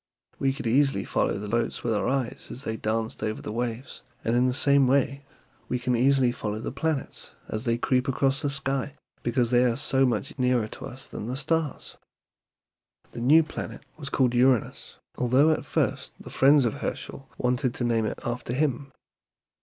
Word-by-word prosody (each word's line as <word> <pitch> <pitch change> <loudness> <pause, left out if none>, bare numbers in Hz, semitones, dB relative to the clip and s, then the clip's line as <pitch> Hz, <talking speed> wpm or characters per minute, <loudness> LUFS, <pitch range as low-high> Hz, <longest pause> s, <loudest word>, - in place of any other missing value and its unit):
We 135 - +2
could 135 0 -7
easily 135 +4 +2
follow - - 0
the 105 +1 -5
boats 115 +2 -1
with 115 - +1
our 105 - 0
eyes 130 -2 -2
as 130 - -6
they 110 -5 -2
danced 110 0 -2
over 110 0 -2
the - - -6
waves, 120 +2 -4 0.2
and 115 - +1
in 125 +1 +3
the - - +2
same 140 +1 +4
way 140 +1 +1 0.4
we 125 - 0
can 125 0 0
easily 130 0 +3
follow 105 -3 -4
the 110 - -4
planets 145 +1 -3 0.2
as 110 +3 -4
they 115 -1 +1
creep 125 +1 +1
across 135 0 +1
the 145 - 0
sky, 135 0 -2 0.3
because 120 0 +1
they 125 0 +5
are 120 -2 +2
so 135 -1 +2
much 125 +4 -2
nearer 125 -3 +2
to 135 - -8
us 130 +1 -8
than 105 - -6
the 125 +2 -3
stars." 155 +1 -1 1.1
"The 120 - -7
new 155 +7 +6
planet 155 - -7
was 145 -3 -7
called 130 -3 +2
Uranus, 125 -1 +1 0.2
although 130 +5 +4
at 155 - -1
first - - -1
the - - -11
friends 140 0 +5
of 115 - -2
Herschel 135 -1 -5
wanted 125 0 0
to - - -2
name 115 -2 +1
it - - -4
after 120 0 -3
him. 135 -1 -1
125 Hz, 190 wpm, -26 LUFS, 120-135 Hz, 1.1 s, new